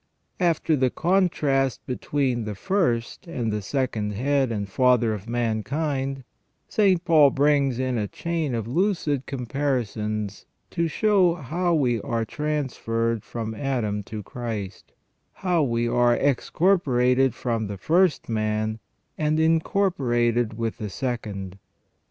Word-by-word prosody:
After 165 -3 +2
the 130 -2 +2
contrast 150 -7 +1
between 125 -2 -1
the 105 -1 -4
first 120 - -1
and 120 -10 -2
the 105 - -2
second 110 -3 -2
head 135 +3 +1
and 100 -3 -2
father 125 +1 +3
of 105 +2 -7
mankind, 135 +4 -1 0.4
St. 190 -5 +2
Paul 155 -5 +6
brings 140 -2 +2
in 130 -2 -1
a 105 - -1
chain 160 - -2
of 115 -2 -3
lucid 155 - 0
com 130 -3 -4
parisons 110 -6 -2 0.3
to 170 -1 0
show 190 -1 +3
how 170 +4 -1
we 125 -7 +1
are 115 +1 -2
transferred 115 -6 -2
from 110 -2 -5
Adam 110 -4 -1
to 105 0 -6
Christ; 110 -4 -6 0.4
how 180 -3 0
we 120 -4 0
are 120 0 +3
excorporated 135 - +2
from 115 -4 -2
the 100 0 -5
first 170 - +2
man 110 0 -1 0.4
and 155 0 +1
incorporated 130 - +1
with 115 -1 -3
the 105 - -4
second. 100 -5 -4
125 Hz, 130 wpm, -24 LUFS, 115-150 Hz, 0.4 s, Paul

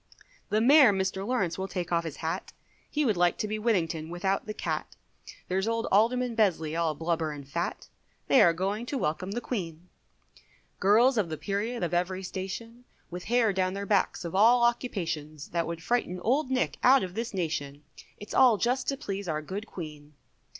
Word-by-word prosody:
The 215 +1 +2
Mayor, 270 -1 +7
Mr 190 0 -1
Lawrence 195 -9 -1
will 190 - -2
take 180 -3 -4
off 170 -1 +1
his 155 -3 -5
hat, 160 - -3 0.4
He 300 -1 0
would 215 -7 +1
like 175 -1 +3
to 215 - -2
be 215 +1 -3
Whittington 165 -8 0
without 190 +4 -1
the 215 - -3
cat, - - -4 0.5
There's 190 +3 0
old 230 0 0
Alderman 240 +4 +3
Besley, 165 -8 +1
all 165 -2 0
blubber 160 0 -1
and 145 -2 -9
fat, 170 +5 -3 0.4
They 270 - +6
are 170 - +7
going 195 +7 -2
to 275 - -2
welcome 175 -3 -2
the 240 - -1
Queen, 175 -8 -5 0.9
Girls 230 +5 +4
of 185 -5 0
the 155 - -4
period, 205 +4 -2
of 170 - -2
every 185 +2 -1
station, 225 +6 -6 0.3
With 180 +1 -6
hair 230 -2 +2
down 185 0 0
their 200 0 -4
backs 200 -3 +1
of 170 - -5
all 235 +5 +5
occupations, 165 - -2
That 170 -1 -1
would 165 0 -5
frighten 210 -6 -1
Old 260 +6 +1
Nick 260 -1 -1
out 260 -1 +6
of 180 -1 -5
this 230 +3 -3
nation, 150 -6 -3 0.3
It's 205 - -9
all 245 -5 +6
just 250 +5 0
to 275 - 0
please 200 -8 -5
our 155 -2 -2
good 200 +7 -6
Queen. 150 -5 -9
190 Hz, 190 wpm, -28 LUFS, 170-230 Hz, 0.9 s, Mayor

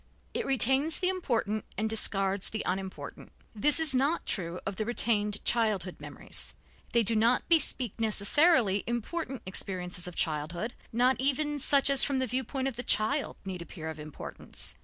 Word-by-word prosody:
It - - -2
retains 270 +4 +4
the 365 - +1
important 230 - -1
and 220 +2 0
discards 195 -3 +1
the 215 - -4
unimportant. 190 +1 -5 0.2
This 285 +9 +3
is 315 -4 +3
not 280 +6 +1
true 175 -2 -2
of 200 -1 -4
the 215 - -1
retained 210 -3 0
childhood 210 -6 +1
memories. - - -8 0.4
They 235 -1 +3
do 225 +2 0
not 230 +3 +3
bespeak 275 - +3
necessarily 220 - +3
important 250 +2 -3
experiences 180 -1 -2
of 180 - -8
childhood, 165 +8 -2 0.2
not 250 +3 +2
even 290 +2 0
such 280 0 +4
as 275 - +7
from 275 - 0
the 260 - +1
viewpoint 260 +2 -2
of 260 -3 -4
the - - -1
child 250 +5 +1
need 185 -2 -5
appear 160 -1 -7
of 155 - -10
importance. 150 -1 -8
225 Hz, 160 wpm, -29 LUFS, 195-270 Hz, 0.4 s, as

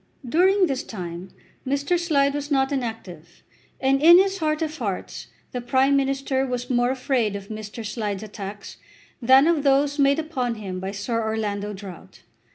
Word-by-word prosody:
During 370 +8 +4
this 270 -6 -2
time 180 -2 -7 0.3
Mr. 285 +6 0
Slide 280 -5 +2
was 290 0 -4
not 270 -1 +1
inactive, 220 - -6 0.4
and 270 +1 +2
in 340 +3 +9
his 385 +1 +2
heart 310 0 0
of 310 0 -4
hearts 200 -6 -4 0.2
the 250 - -4
Prime 260 +3 +2
Minister 270 -1 0
was 250 -1 -3
more 245 0 +2
afraid 255 -5 0
of 200 0 -8
Mr. 215 +1 -7
Slide's 210 -2 -3
attacks 205 -1 -8 0.4
than 260 +4 +6
of 330 -2 +2
those 280 +1 +2
made 280 +1 +4
upon 270 -7 -2
him 190 -4 -6
by 190 +1 -4
Sir 210 +4 -2
Orlando 210 -2 -2
Drought. 190 -2 -11
255 Hz, 165 wpm, -23 LUFS, 210-280 Hz, 0.4 s, in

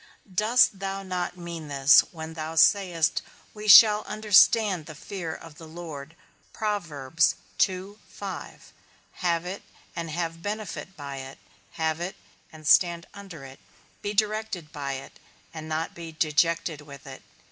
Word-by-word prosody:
Dost 215 +1 +3
thou 195 0 -4
not 180 -1 -3
mean 170 -3 -7
this 140 0 +6
when 160 -1 -8
thou 160 0 -5
sayest, 170 -1 +3 0.3
we 215 0 -8
shall 210 0 +9
understand 210 -4 +4
the 155 - -9
fear 170 +1 -6
of 160 -1 -11
the 165 - -10
Lord? 160 -2 -9 0.4
Have 205 -6 -2 2.5
it, 185 +3 -5 0.3
and 165 -1 -4
have 165 +1 -4
benefit 205 -1 -5
by 140 -2 -7
it; 135 0 -8 0.4
have 160 0 -1
it, 175 +2 -4 0.4
and 155 -1 -13
stand 170 0 +4
under 195 -7 -10
it; 135 0 -12 0.4
be 205 +1 -3
directed 215 -6 -1
by 140 -3 -4
it, 135 0 -9 0.3
and 155 -1 -8
not 160 +1 -2
be 165 -1 -8
dejected 160 +1 0
with 140 -2 -13
it. 135 -1 -10
165 Hz, 135 wpm, -26 LUFS, 155-195 Hz, 2.5 s, shall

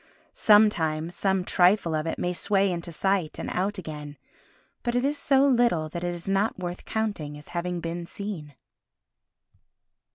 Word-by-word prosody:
Sometimes, 170 -7 +3
some 190 -1 +1
trifle 180 -1 +3
of 155 +1 -1
it - - -2
may 180 0 -1
sway 195 +1 +1
into 170 -1 -4
sight 190 -1 0
and - - -4
out 195 +3 -1
again, 150 -4 -7 0.6
but 240 -1 -2
it 245 +2 +2
is 290 +1 +1
so 275 -1 +3
little 235 - +3
that 170 +2 -5
it 175 - -1
is 175 0 -7
not 195 +3 +1
worth 180 -1 -5
counting 200 -10 -3
as 150 - -14
having 175 0 -2
been 170 +1 -4
seen. 170 -9 -6
180 Hz, 160 wpm, -26 LUFS, 165-205 Hz, 0.6 s, Sometimes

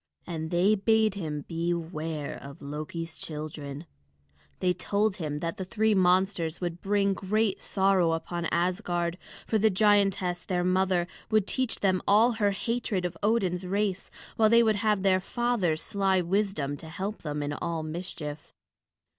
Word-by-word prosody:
And 160 -2 -4
they 180 +5 +3
bade 220 +1 +3
him 155 -7 -4
beware 165 -2 -3
of 140 0 -10
Loki's 155 +3 -6
children; 150 -1 -6 0.7
they 180 -1 +2
told 205 +2 0
him 150 -4 -3
that 165 0 -3
the 190 - -3
three 220 +3 +1
monsters 185 -3 +2
would 175 -1 -4
bring 200 0 +2
great 205 +2 0
sorrow 190 -4 +2
upon 170 +1 -3
Asgard, 175 0 0 0.3
for 220 - +1
the 220 +2 +4
giantess 195 -3 +2
their 180 0 -1
mother 185 -1 +2 0.2
would 215 -3 +3
teach 260 +2 -1
them 185 -2 +2
all 220 +4 +5
her 215 -3 +1
hatred 200 -2 -1
of 180 - -3
Odin's 195 -5 +1
race, 195 0 -1 0.3
while 220 -1 +5
they 235 +1 +6
would 220 -2 +2
have 210 -2 +1
their 190 -1 +4
father's 195 -6 0
sly 195 -2 +1
wisdom 180 -6 0
to 160 - -10
help 195 +6 -4
them 150 -1 -3
in 145 0 -2
all 165 +1 -3
mischief. 155 -2 -6
185 Hz, 155 wpm, -28 LUFS, 165-205 Hz, 0.7 s, they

